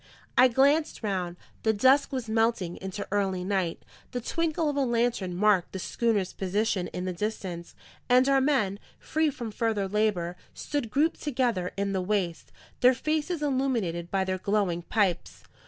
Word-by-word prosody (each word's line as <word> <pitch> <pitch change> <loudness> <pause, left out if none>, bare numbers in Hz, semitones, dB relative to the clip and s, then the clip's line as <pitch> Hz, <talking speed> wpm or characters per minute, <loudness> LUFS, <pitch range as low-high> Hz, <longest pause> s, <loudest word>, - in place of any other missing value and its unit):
I 255 - +7
glanced 280 +4 +2
round; 180 -4 -2 0.2
the 220 - +2
dusk 260 +6 +4
was 255 -4 -3
melting 220 -5 0
into 190 +1 -6
early 195 -3 0
night; 185 -3 -1 0.3
the 250 - -1
twinkle 325 +5 -1
of 290 - -1
a - - 0
lantern 235 -7 0
marked 200 -2 +2
the - - -3
schooner's 205 0 0
position 195 0 -1
in 180 - -5
the 185 - -2
distance; 180 -3 -5 0.3
and 250 +2 +5
our 275 -1 +4
men, 245 -9 +1 0.2
free 315 0 0
from 240 -5 -6
further 215 -3 0
labour, 190 -4 0 0.2
stood 285 -6 -3
grouped 305 +7 +1
together 240 -10 0
in 200 0 -1
the 190 - 0
waist, 180 -3 -2 0.3
their 250 +1 +5
faces 310 +3 -1
illuminated 235 - -1
by 195 0 +1
their 185 0 -2
glowing 195 -3 0
pipes. 190 -1 -1
215 Hz, 160 wpm, -27 LUFS, 185-260 Hz, 0.3 s, I